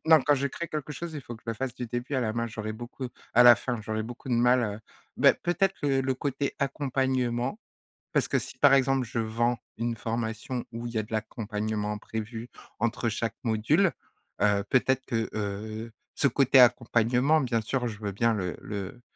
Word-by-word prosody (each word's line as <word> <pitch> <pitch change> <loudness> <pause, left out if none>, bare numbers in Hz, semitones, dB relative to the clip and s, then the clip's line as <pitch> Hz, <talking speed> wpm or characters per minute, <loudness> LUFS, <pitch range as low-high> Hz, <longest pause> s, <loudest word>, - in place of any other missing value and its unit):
Non, 160 -2 +7
quand 145 +1 +4
je 140 +1 0
crée 170 +4 -5
quelque 150 -1 -4
chose, 165 +3 -6
il 145 - -4
faut 120 - -8
que 110 - -15
je 115 - -2
le 115 - -3
fasse 130 +1 -4
du 125 - -5
début 120 +4 -4
à 130 - +2
la 110 -2 0
main, 115 0 -1
j'aurais 110 -1 -5
beaucoup 120 +3 -7 0.3
à 120 - +8
la 120 -1 +10
fin. 120 -2 -3
J'aurais 110 0 -3
beaucoup 120 +3 -9
de 120 - +2
mal, 125 +1 +4
heu, 105 0 -3 0.4
bah, - - +6
peut-être 195 +2 0
que - - -1
le 130 0 0
côté 140 +1 -2
accompagnement, 130 - 0 0.5
parce - - +2
que - - +1
si, - - -8
par 140 -1 +7
exemple, 135 -1 +3
je 115 - -3
vends 115 +2 0 0.2
une 115 +1 -1
formation 115 +2 -3
où 115 +1 -5
il 120 - -7
y 110 - -1
a 110 - +1
de 105 - -15
l'accompagnement 105 -1 -2
prévu 110 +2 -6 0.3
entre 115 +1 0
chaque 115 +1 -2
module, 125 - +3 0.5
heu, 100 -1 +3
peut-être 130 +1 +2
que, 115 -1 -1
heu, 110 +2 -4 0.2
ce - - +3
côté 135 0 +4
accompagnement, 125 +4 +4
bien 120 -3 0
sûr, 125 +2 -1
je 105 -2 -6
veux 105 -2 -3
bien 115 +4 +2
le 95 -4 -2
le 100 +3 -6
120 Hz, 205 wpm, -28 LUFS, 110-130 Hz, 0.5 s, la